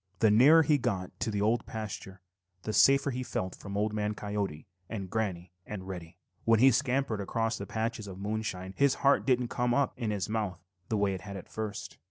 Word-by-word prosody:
The 110 +1 +4
nearer 145 +9 +7
he 145 0 +3
got 95 -5 -2
to 120 - -1
the 105 -1 0
Old 115 +2 +1
Pasture, 100 -3 -6 0.4
the 110 - -3
safer 140 +3 +5
he 125 0 -3
felt 95 -7 -3
from 100 0 -6
Old 105 +1 0
Man 105 0 -1
Coyote 100 -7 -3 0.2
and 95 -5 -5
Granny 95 -6 -2
and 95 -2 -7
Reddy 90 -2 -7
Fox. - - -48
When 115 -1 +5
he 135 +3 +7
scampered 125 -3 0
across 115 +3 -1
the 100 - -5
patches 110 0 -3
of 95 -2 -8
moonshine 100 -2 -3
his 140 -1 +3
heart 140 0 +4
didn't 125 -2 +2
come 125 -1 +1
up 140 -2 +2
in 115 -3 -2
his 100 -3 -1
mouth 105 -4 -2 0.3
the 110 - +1
way 100 -1 +2
it 95 - -5
had 100 -1 -7
at 95 - -10
first. 110 -2 -5
105 Hz, 215 wpm, -30 LUFS, 95-120 Hz, 0.4 s, nearer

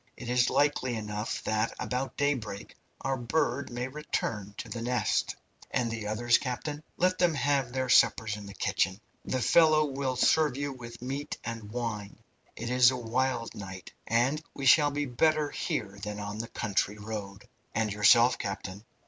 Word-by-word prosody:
It 120 - -7
is 125 0 +3
likely 145 -4 +1
enough 105 0 -4
that 110 +1 0
about 130 +1 -3
daybreak 115 -9 -2 0.3
our 135 - 0
bird 130 +2 0
may 120 +1 -3
return 115 -8 -3
to - - -6
the 115 - -5
nest." 125 +1 0 0.3
"And 120 -2 0
the 110 -2 -4
others, 120 +3 +3
captain?" 145 +3 -4 0.2
"Let 185 +1 +2
them 175 -3 +3
have 140 -3 +1
their 130 0 -1
suppers 110 -3 +4
in 105 -1 -9
the 100 - -10
kitchen. 95 +2 0 0.3
The 130 - -1
fellow 155 +3 +5
will 135 -2 -2
serve 150 +1 +3
you 145 0 -2
with 120 -2 -10
meat 135 +3 -4
and 115 -2 -6
wine. 115 -4 -4 0.4
It 115 +2 -4
is 125 -1 +7
a 130 - -2
wild 125 0 -1
night, 95 -2 -9
and 130 +7 +2
we 140 - -4
shall 145 +2 +7
be 145 0 -2
better 150 +3 +2
here 100 -2 -3
than 105 +1 -5
on 105 +1 -5
the 115 - -3
country 105 -2 -1
road." 105 0 -7 0.3
"And 110 -3 0
yourself, 115 +4 +5
captain?" 100 0 -5
120 Hz, 170 wpm, -29 LUFS, 105-135 Hz, 0.4 s, is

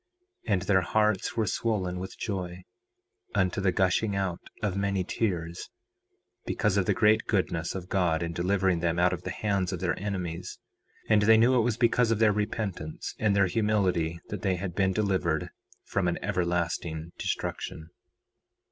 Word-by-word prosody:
4:33 105 - +2
And 90 - +2
their 95 -1 +3
hearts 105 +3 +1
were 110 - +2
swollen 95 -6 -1
with 95 - -7
joy, 90 -4 -4 0.7
unto 95 -1 +1
the 95 -1 +3
gushing 95 +3 +1
out 95 -3 -1 0.2
of 100 -3 0
many 100 -1 0
tears, 85 -5 -2 0.7
because 105 -2 0
of 100 -3 +1
the - - +2
great 110 -1 +4
goodness 85 -5 0
of 90 -2 -5
God 85 -4 +1
in 85 0 -3
delivering 95 0 +1
them 85 0 0
out 90 +1 +3
of 90 - -4
the - - -5
hands 100 -3 -1
of 90 - -3
their 90 -1 -1
enemies; 90 -4 -4 0.5
and 105 -1 +4
they 110 +2 +6
knew 120 +3 +5
it - - +5
was 115 -1 0
because 120 0 +3
of 115 - +2
their 110 -1 +4
repentance 100 -6 -3
and 105 -2 +2
their 100 -1 +5
humility 90 -5 +1
that - - -5
they 95 -3 +1
had 90 0 -4
been 95 +1 +2
delivered 95 -6 0 0.3
from 100 -3 -1
an 85 - 0
everlasting 85 -3 -1
destruction. 80 +1 -4
95 Hz, 170 wpm, -28 LUFS, 90-105 Hz, 0.7 s, they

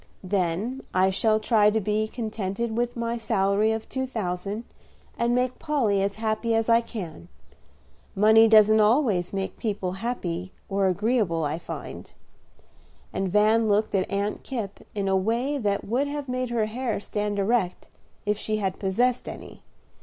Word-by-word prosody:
"Then 190 +7 -1
I 190 +1 +4
shall 215 +3 +2
try 215 -1 +4
to 220 +1 +1
be 215 +1 0
contented 220 -1 -3
with 240 +1 -1
my 235 0 -2
salary 210 -1 +2
of 220 0 -3
two 260 0 -3
thousand, 200 -2 -3 0.5
and 235 +1 +1
make 250 0 0
Polly 240 -11 +1
as 200 0 -1
happy 220 +1 -1
as 225 +1 +1
I 230 0 +5
can. 175 - -8 0.9
Money 220 +2 +6
doesn't 215 0 +6
always 210 - +2
make 195 -1 -4
people 200 -5 -2
happy 185 -4 -4 0.2
or 195 -1 +1
agreeable, 195 -3 +1
I 150 +2 -2
find." - - -8 1.0
And 190 -2 -1
Van 215 +2 +4
looked 210 +1 +2
at 190 -2 +1
Aunt 200 +1 -2
Kipp 225 -7 -5 0.2
in 200 -1 -1
a 190 - +2
way 235 +9 0
that 205 -4 -1
would 255 +7 0
have 290 -1 -4
made 255 0 -2
her 235 -2 +1
hair 235 +1 -2
stand 210 0 -3
erect 200 -2 0 0.4
if 210 0 0
she 215 0 -1
had 190 -3 -2
possessed 240 +6 0
any. - - -10
215 Hz, 160 wpm, -25 LUFS, 195-235 Hz, 1.0 s, Money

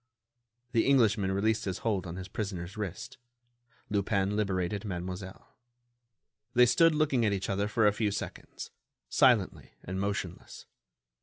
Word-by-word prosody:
The 115 - +2
Englishman 110 -8 +3
released 110 +3 +1
his 95 -2 -2
hold 100 -5 0
on 85 - -6
his 95 0 -7
prisoner's 95 -3 -5
wrist. 105 +2 -6 0.7
Lupin 100 -1 +1
liberated 95 -1 -1
Mademoiselle. 95 -1 -6 1.0
They 125 0 +7
stood 165 +6 +4
looking 145 -5 +2
at 105 -2 +2
each 100 0 -2
other 100 +1 0
for 110 +1 +2
a 105 - +5
few 105 0 0
seconds, 100 - -6 0.4
silently - - +2
and 95 +1 -4
motionless. 100 -3 -4
100 Hz, 135 wpm, -30 LUFS, 95-110 Hz, 1.0 s, They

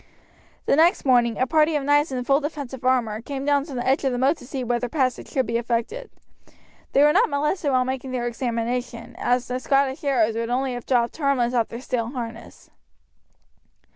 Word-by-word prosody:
The - - +3
next 330 +4 +3
morning 240 -4 +3
a 255 - +2
party 310 +2 +2
of 290 - 0
knights 290 +1 +2
in 250 -1 -2
full 275 +3 +3
defensive 280 -4 -6
armour 240 -4 +1
came 275 +2 -5
down 285 -1 +2
to 285 -4 -8
the 245 - -3
edge 265 +2 +2
of 270 - +1
the 245 - -2
moat 270 +5 +2
to - - -13
see 265 -1 -4
whether 240 0 -1
passage 255 -4 -1
could 260 - 0
be 230 +1 -1
effected. 240 - -3 0.8
They 280 - +5
were 300 0 +5
not 440 +6 +3
molested 300 +2 0
while 255 -2 +2
making 260 0 -4
their 250 -2 -2
examination, 235 0 -3
as 245 0 0
the 250 0 -3
Scottish 275 +1 +1
arrows 240 -6 +2
would 230 +1 -3
only 255 +1 0
have 245 -1 -7
dropped 240 -2 +1
harmless 275 -5 +1
off 235 -3 +1
their 235 - -8
steel 245 -4 -2
harness. 235 -3 -8
255 Hz, 200 wpm, -23 LUFS, 240-280 Hz, 0.8 s, They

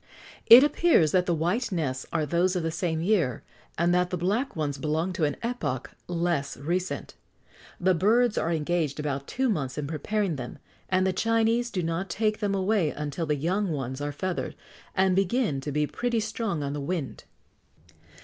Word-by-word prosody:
It 240 +4 +11
appears 295 - +4
that 180 -1 +2
the 175 - +2
white 180 +11 0
nests 140 -8 -2
are 160 -2 0
those 175 +5 +1
of 180 - -1
the 165 - -1
same 160 -1 -1
year, 170 - +1 0.3
and 170 +1 +2
that 180 0 +2
the 180 - -2
black 205 - -1
ones 145 -3 -2
belong 160 +5 -1
to 165 -3 +1
an 145 - -2
epoch 155 - -3 0.2
less 170 -4 -1
recent. 175 +6 -3 0.7
The 185 +1 +3
birds 220 +6 +3
are 165 - 0
engaged 160 -2 -1
about 140 -2 -3
two 265 +1 0
months 145 - -1
in 150 - -2
preparing 165 +4 -1
them, 125 -2 -7 0.3
and 185 0 +2
the 190 - +1
Chinese 230 +3 +1
do 185 -6 -2
not 165 +3 -2
take 215 +4 0
them 205 -2 0
away 195 -3 +2
until 150 +2 -4
the 150 - +1
young 185 +7 0
ones 135 -3 -3
are 145 0 -2
feathered, 180 +5 -3 0.4
and 190 -1 +3
begin 195 - +1
to 145 +2 -4
be 150 +1 +1
pretty 235 - -1
strong 215 -6 -2
on 140 0 -3
the 145 - -4
wing. 150 -2 -3
175 Hz, 185 wpm, -27 LUFS, 150-200 Hz, 0.7 s, It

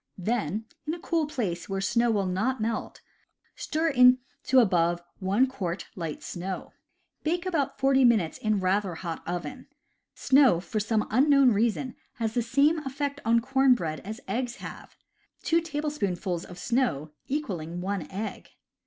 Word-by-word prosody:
Then, 210 0 -1 0.2
in 315 - -1
a - - -10
cool 330 -2 0
place 205 - -3
where 195 0 -1
snow 235 +5 +2
will 205 -3 +1
not 215 +8 0
melt, 225 +1 -3 0.5
stir 320 +1 -1
into 255 0 +3
above 175 -6 +3 0.2
one 200 +6 +3
quart 185 -9 -4
light 165 -4 -5
snow. 185 +2 -5 0.5
Bake 345 +3 -1
about 320 -7 -1
forty 270 0 +4
minutes 220 -9 +3
in 215 -2 +1
rather 190 -1 0
hot 165 -1 -5
oven. 180 +9 -5 0.5
Snow, 265 -10 +5
for 215 +4 -3
some 215 0 0
unknown 275 +2 +5
reason, 235 +4 0 0.2
has 225 -2 -2
the 240 - +1
same 280 +7 +3
effect 280 0 -4
on 230 +1 +4
corn 265 +1 +4
bread 155 -8 -3
as 215 +4 -7
eggs 245 0 -2
have, - - -10 0.5
two 335 0 +3
tablespoonfuls 285 - -2
of 180 - -11
snow 200 - 0 0.2
equaling 180 - -3
one 190 -1 -3
egg. 210 +3 -6
230 Hz, 150 wpm, -27 LUFS, 185-270 Hz, 0.5 s, Snow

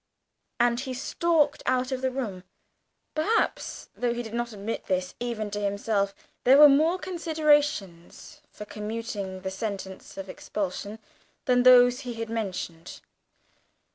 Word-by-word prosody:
And 240 0 +3
he 260 -1 -4
stalked 300 +2 +1
out 255 +1 +1
of 260 -1 -2
the 260 - +1
room. 225 -9 -4 0.7
Perhaps, 420 +9 -1
though 240 -1 -1
he 240 - -3
did 220 -1 -9
not 240 0 -2
admit 210 +2 -5
this 185 -1 -1
even 230 -4 -3
to 205 - -3
himself, 200 0 -1 0.3
there 265 +2 +7
were 295 0 +11
more 310 +6 +4
considerations 300 - 0
for 210 - -9
commuting 210 -3 -5
the 190 0 -4
sentence 190 -2 -6
of 195 0 -6
expulsion 205 +2 -4 0.5
than 250 -1 +4
those 245 0 +7
he 250 -4 -6
had 225 0 -5
mentioned. 185 -6 -5
235 Hz, 140 wpm, -27 LUFS, 200-265 Hz, 0.7 s, were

